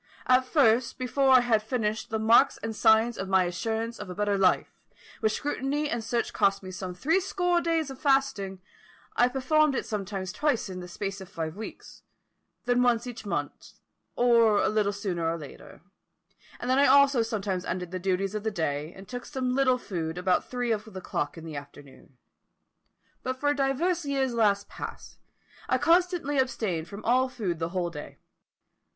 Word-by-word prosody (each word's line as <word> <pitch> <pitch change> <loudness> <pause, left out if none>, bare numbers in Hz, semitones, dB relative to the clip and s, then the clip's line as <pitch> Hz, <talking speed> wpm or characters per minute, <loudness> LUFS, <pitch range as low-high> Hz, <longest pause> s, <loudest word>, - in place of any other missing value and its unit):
At 255 0 +4
first, 245 -4 +3
before 265 +2 +1
I 255 -1 +8
had 230 -3 +2
finished 220 0 -2
the 220 - -1
marks 220 +2 +4
and 225 -1 -3
signs 225 +2 +4
of 190 - -4
my 190 -1 +4
assurance 225 +6 -3
of 205 - -7
a 180 - -6
better 205 0 0
life, 190 -2 +2 0.5
which 215 -1 +1
scrutiny 290 +2 -2
and 235 -1 -2
search 235 +1 -2
cost 195 0 +2
me 185 - -7
some 185 0 -6
three 320 - +2
score 355 -2 0
days 325 -4 0
of 265 - -10
fasting, 270 -10 +1 0.5
I 245 - +4
performed 275 +3 +2
it - - -2
sometimes 195 -2 -4
twice 265 -5 0
in 185 -1 -6
the 180 - -8
space 195 +2 -5
of 190 - -10
five 160 -4 -5
weeks, 220 +2 -9 0.6
then 245 0 +2
once 240 -1 +2
each 235 -4 -8
month, 145 -6 -4 0.4
or 230 -3 +4
a - - +2
little 215 -1 +1
sooner 185 -5 -2
or 165 - -2
later, 150 -4 -12 0.8
and 245 - -5
then 260 +2 +3
also 280 -1 +5
I - - +4
sometimes 205 -5 -2
ended 180 -1 -4
the 185 - -3
duties 190 +1 -1
of 215 - -3
the 220 - -1
day, 155 -5 -2
and 190 0 -12
took 245 -1 -6
some 260 -3 -2
little 260 -1 +3
food 170 -8 -4
about 180 0 0
three 245 -1 -1
of 215 0 -2
the 190 - -7
clock 145 -2 -3
in 165 - -9
the 155 -3 -6
afternoon. 140 -2 -13 1.0
But 255 0 -4
for 290 +1 +2
divers 290 +6 0
years 270 -3 0
last 205 -3 +2
past, - - -9 0.5
I - - +3
constantly 345 -4 +2
abstained 200 -11 -1
from 200 +3 -9
all 255 +2 +3
food 195 -10 -3
the 165 0 -2
whole 175 -1 -2
day. 150 -2 -9
220 Hz, 185 wpm, -27 LUFS, 190-260 Hz, 1.0 s, I